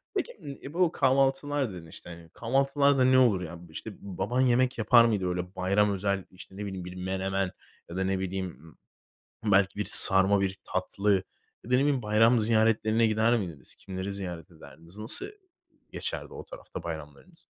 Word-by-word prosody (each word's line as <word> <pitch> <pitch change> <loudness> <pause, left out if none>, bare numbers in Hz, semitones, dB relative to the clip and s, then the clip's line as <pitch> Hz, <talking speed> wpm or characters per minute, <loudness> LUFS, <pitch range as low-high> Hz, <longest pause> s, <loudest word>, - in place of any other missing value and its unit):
Peki, 485 - -5
ımm, 140 -1 -9
e, 140 - -10
bu 175 -1 0
kahvaltılar 135 - -1
dedin, 85 -2 -11
işte, 80 - -14
hani, 85 -1 -13
kahvaltılarda 135 - 0
ne 130 0 +3
olur 115 -8 +2
ya? 85 0 -10
B - - -18
işte, 110 +7 -9
baban 105 +6 -4
yemek 125 0 0
yapar 115 +1 +4
mıydı? 105 -5 -2
Öyle 90 +1 -6
bayram 100 +3 0
özel, 100 -1 -3
işte, 95 +1 -15
ne 105 - -6
bileyim, 95 -2 -8
bir 90 0 -10
menemen, 95 +1 -4 0.4
ya 85 - -8
da, 95 - -1
ne 95 0 -2
bileyim, 95 0 -5 1.0
ımm, 105 - -2
belki 95 +1 +1
bir 105 - -4
sarma, 95 +1 +9
bir 95 0 -3
tatlı 100 +2 -2 0.5
ya 120 - -12
da, - - +1
ne - - +1
bileyim, 140 -2 -1
bayram 115 +3 +2
ziyaretlerine 110 0 +2
gider 110 +2 +1
miydiniz? 85 - -9
Kimleri 95 +1 -8
ziyaret 90 -2 -7
ederdiniz? 80 +4 -16
Nasıl 110 - +5 0.7
geçerdi - - -7
o - - -10
tarafta - - -11
bayramlarınız? 80 -4 -11
100 Hz, 175 wpm, -26 LUFS, 95-120 Hz, 1.0 s, sarma